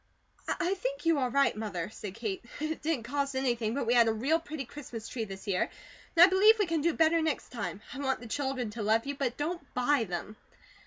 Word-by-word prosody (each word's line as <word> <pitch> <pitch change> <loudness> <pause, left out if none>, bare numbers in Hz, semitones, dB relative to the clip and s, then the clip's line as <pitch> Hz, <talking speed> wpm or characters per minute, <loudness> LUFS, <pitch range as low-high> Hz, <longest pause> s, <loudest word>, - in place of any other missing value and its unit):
"I 360 +1 0
think - - -4
you 330 -3 +4
are 255 -2 +1
right, 275 +2 +3
Mother," 205 -4 -4
said 200 -3 -7
Kate. 220 -3 -4 0.2
"It 310 +1 -3
didn't 300 -6 -1
cost 275 +3 -2
anything, 240 -4 0
but 280 - -1
we 235 - +2
had 235 -2 +6
a - - +4
real 270 +9 +1
pretty 310 -4 -6
Christmas 235 -4 -8
tree 230 -3 -3
this 195 -1 -9
year, 190 -3 0 0.5
and 335 - +9
I - - +13
believe 395 +4 +6
we 415 - +2
can 330 -3 0
do 335 +1 +1
better 325 +1 +4
next 315 -3 -1
time. 215 -4 -4
I 275 - -7
want 265 -2 0
the 245 - -10
children 260 -2 -2
to 225 +1 -6
love 220 +3 +2
you, 280 - -2
but 270 -4 -2
don't 340 +4 -2
BUY 250 0 +2
them." 180 +3 -5
265 Hz, 230 wpm, -30 LUFS, 225-315 Hz, 0.5 s, I